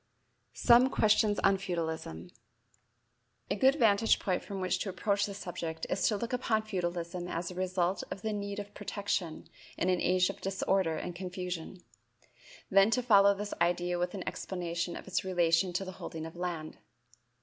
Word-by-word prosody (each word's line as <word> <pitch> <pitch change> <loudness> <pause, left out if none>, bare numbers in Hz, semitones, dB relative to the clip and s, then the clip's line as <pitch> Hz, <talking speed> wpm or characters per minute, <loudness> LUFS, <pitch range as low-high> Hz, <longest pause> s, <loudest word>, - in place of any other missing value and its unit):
Some 240 +1 +6
Suggestions 210 -3 +3
on 195 0 +4
Feudalism. 160 - -4 1.2
A - - +2
good 265 +6 +4
vantage 225 -5 +4
point 185 -2 -1
from 200 -2 -6
which 185 -1 0
to 200 - -2
approach 200 +2 0
the 200 - -6
subject 170 -4 -5
is 195 - +2
to 210 - +1
look 235 +4 -4
upon 225 -3 +1
feudalism 175 -3 -3
as 170 0 -3
the - - -7
result 185 0 0
of 195 - -7
the 220 -1 -1
need 200 0 -4
of 205 0 -7
protection 200 -5 -3 0.3
in 180 - +1
an 180 -1 +2
age 185 +1 +3
of - - -16
disorder 190 -3 0
and 175 - -5
confusion; 180 -1 -5 0.9
then 195 +2 +6
to 250 +2 +1
follow 200 -4 +6
this 205 +1 -4
idea 175 +1 +1
with 180 +2 -1
an 190 - -6
explanation 175 -1 -3
of - - -9
its 190 - 0
relation 175 -1 +2
to 195 +3 -1
the 185 - -6
holding 160 -2 -7
of 165 - -9
land. 170 -3 -4
185 Hz, 170 wpm, -31 LUFS, 175-200 Hz, 1.2 s, Some